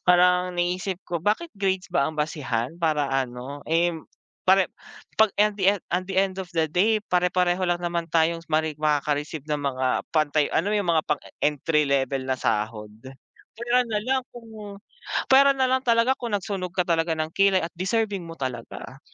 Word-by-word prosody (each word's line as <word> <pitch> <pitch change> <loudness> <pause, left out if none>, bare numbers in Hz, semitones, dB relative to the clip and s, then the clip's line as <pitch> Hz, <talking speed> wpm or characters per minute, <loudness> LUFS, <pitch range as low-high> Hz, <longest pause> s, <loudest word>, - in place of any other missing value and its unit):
Parang 180 0 +4
naisip 180 +1 -1
ko, 170 -2 -3
bakit 220 - 0
grades 190 -2 -1
ba 140 -4 +2
ang 155 - -8
basehan 150 -1 -2
para 150 -4 +1
ano, 130 +2 -3
eh, 170 +2 +2 0.6
pare 190 -1 +5 0.5
'pag 220 - +7
and 210 0 +3
the 190 - +4
end, - - -14
at 180 +1 0
the 190 - -4
end 190 0 +2
of 185 - -7
the 160 - +3
day, 210 +6 +3 0.2
pare-pareho 180 0 +2
lang 175 0 0
naman 170 -1 -2
tayong 165 +1 +2
mare 155 0 +1
makaka-receive 150 0 -1
ng 150 -1 -1
mga 130 -2 -1 0.3
pantay 155 -1 +2
ano 200 +6 +1
yung 205 -4 0
mga 160 -2 +3
pang-entry 150 +1 0
level 135 -1 0
na 130 0 -1
sahod. 105 -1 -2 0.7
Puwera 240 +1 +2
na 220 -3 -2
lang 260 +4 0
kung 215 -4 -10 0.5
puwera 275 +1 +7
na 260 -1 +1
lang 260 0 +2
talaga 235 +2 +3
kung 235 -4 -4
nagsunog 190 -3 -4
ka 180 - +2
talaga 165 0 +1
ng 155 0 -3
kilay 195 -1 +3
at 165 - -4
deserving 200 -1 -1
mo 165 - -8
talaga. 130 0 -6
175 Hz, 175 wpm, -25 LUFS, 150-200 Hz, 0.7 s, pag